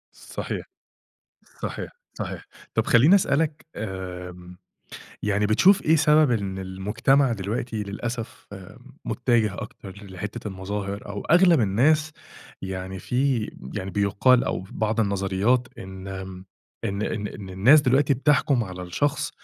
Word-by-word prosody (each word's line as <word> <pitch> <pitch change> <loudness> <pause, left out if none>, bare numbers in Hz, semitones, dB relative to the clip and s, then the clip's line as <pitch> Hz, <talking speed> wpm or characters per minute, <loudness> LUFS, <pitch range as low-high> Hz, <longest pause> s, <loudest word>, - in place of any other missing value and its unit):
صحيح، - - -6 1.0
صحيح، - - -4 0.2
صحيح، - - -6 0.3
طَب - - +1
خلّيني 140 +12 +6
اسألك 155 -4 +1
آمم، 90 -3 -7 0.7
يعني 105 0 +1
بتشوف 185 - +5
إيه 160 +1 +4
سبب 150 -2 +4
إن 100 -4 -1
المجتمع 105 +8 +1
دلوقتي 110 +2 -3
للأسف 115 +3 -6
آآ، 95 -2 -11 0.3
متجه 110 -5 +1
أكتر 100 +1 -10
ل 95 - -12
لحتة 105 +3 -6
المظاهر، 100 +1 -5
أو 100 0 -5
أغلب 175 -3 +5
الناس 150 +10 +2 0.5
يعني 95 0 -5
في 125 -1 0 0.2
م 65 - -9
يعني 95 -2 -4
بيُقال 105 +5 +3
أو - - -2
في - - -15
بعض 110 +1 0
النظريات 100 +5 +1
إن 95 -2 -7
م 95 0 -10 0.4
إن 100 +1 -2
إن 105 -2 -2
إن 100 -2 -9
الناس 120 +12 +6
دلوقتي 135 +1 +3
بتحكُم 140 -2 +2
على 90 -1 -7
الشخص 135 +11 -1
105 Hz, 135 wpm, -24 LUFS, 95-130 Hz, 1.0 s, خلّيني